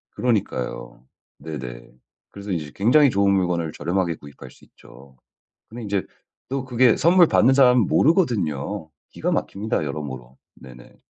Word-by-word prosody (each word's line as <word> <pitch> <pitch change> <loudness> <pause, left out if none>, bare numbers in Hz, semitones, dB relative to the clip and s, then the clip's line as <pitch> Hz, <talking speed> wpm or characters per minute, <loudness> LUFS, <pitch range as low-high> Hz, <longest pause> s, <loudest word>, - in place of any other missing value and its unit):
그러니까요. 100 - -3 0.3
네네. 60 -6 -8 0.4
그래서 100 0 -8
인제 75 -5 -4
굉장히 135 +8 +4
좋은 100 -3 +2
물건을 90 -4 0
저렴하게 85 +2 -2
구입할 70 -3 -13
수 - - -20
있죠. 65 -1 -18 0.5
근데 120 +2 -9
인제 100 -3 -2 0.4
또 135 0 -3
그게 125 -2 +3
선물 175 +1 +5
받는 130 -2 +3
사람은 125 -5 +5
모르거든요. 100 - 0 0.2
기가 - - -3
막힙니다 100 -4 -2
여러모로. 65 -4 -7 0.2
네네. 60 -2 -16
95 Hz, 330 characters per minute, -22 LUFS, 75-120 Hz, 0.5 s, 선물